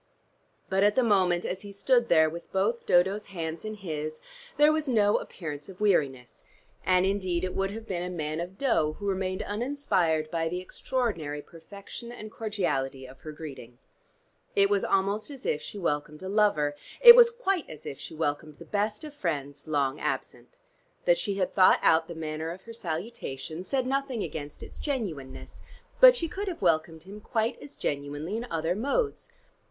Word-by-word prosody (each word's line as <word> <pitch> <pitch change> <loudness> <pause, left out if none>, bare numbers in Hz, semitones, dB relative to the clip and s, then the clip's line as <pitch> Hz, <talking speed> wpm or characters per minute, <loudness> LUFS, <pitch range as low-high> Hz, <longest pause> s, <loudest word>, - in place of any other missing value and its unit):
But 190 0 +1
at 205 0 +4
the 260 - +4
moment, 185 -5 +3
as 185 +1 -3
he 205 - -9
stood 235 +4 +2
there 160 -2 +6
with 170 +2 -7
both 210 +5 0
Dodo's 190 +4 +3
hands 165 -4 -5
in 215 0 -5
his, 155 -6 -5 0.4
there 295 +1 +6
was 310 -1 0
no 210 -5 +4
appearance 150 -3 -7
of 185 - -11
weariness, 140 - 0 0.4
and 185 0 +3
indeed 185 -3 0
it 185 - -2
would 195 0 0
have 220 +2 -7
been 180 -5 -3
a 180 - -3
man 155 -3 -3
of 180 +3 -6
dough 160 - +2
who 205 - -8
remained 185 -1 -1
uninspired 200 - 0
by 165 -1 0
the 180 +2 -3
extraordinary 185 - -3
perfection 200 +7 -10
and 215 -3 -9
cordiality 175 -13 -2
of 130 0 -13
her 155 - -8
greeting. 135 -6 -9 0.8
It 200 0 +4
was 200 -1 +2
almost 200 +4 +1
as 275 -2 -10
if 150 - 0
she - - -8
welcomed 150 -3 -2
a 190 - -4
lover: 200 -9 +2 0.2
it 475 -1 +12
was 480 -1 +8
quite 390 -8 -1
as 155 - -10
if 135 - -6
she - - -9
welcomed 150 -1 -2
the 170 - -12
best 210 - -1
of 300 -2 -8
friends 145 - -4
long 145 -2 0
absent. - - -4 0.5
That - - +4
she 200 -3 -2
had 190 -2 -1
thought 185 -2 +6
out 160 0 +4
the 170 - -7
manner 160 0 -4
of 180 +3 -8
her 230 - -10
salutation, 165 - -5
said 260 +5 0
nothing 270 -3 -1
against 145 -2 -6
its - - -11
genuineness, 180 - -5 0.4
but - - +10
she 335 - -1
could 395 +4 -5
have 345 - -4
welcomed 160 -1 +1
him 200 +3 -10
quite 225 +1 -1
as 285 - -11
genuinely 145 +6 -3
in 235 +2 -4
other 165 +1 0
modes. 350 - -1
185 Hz, 185 wpm, -28 LUFS, 155-220 Hz, 0.8 s, it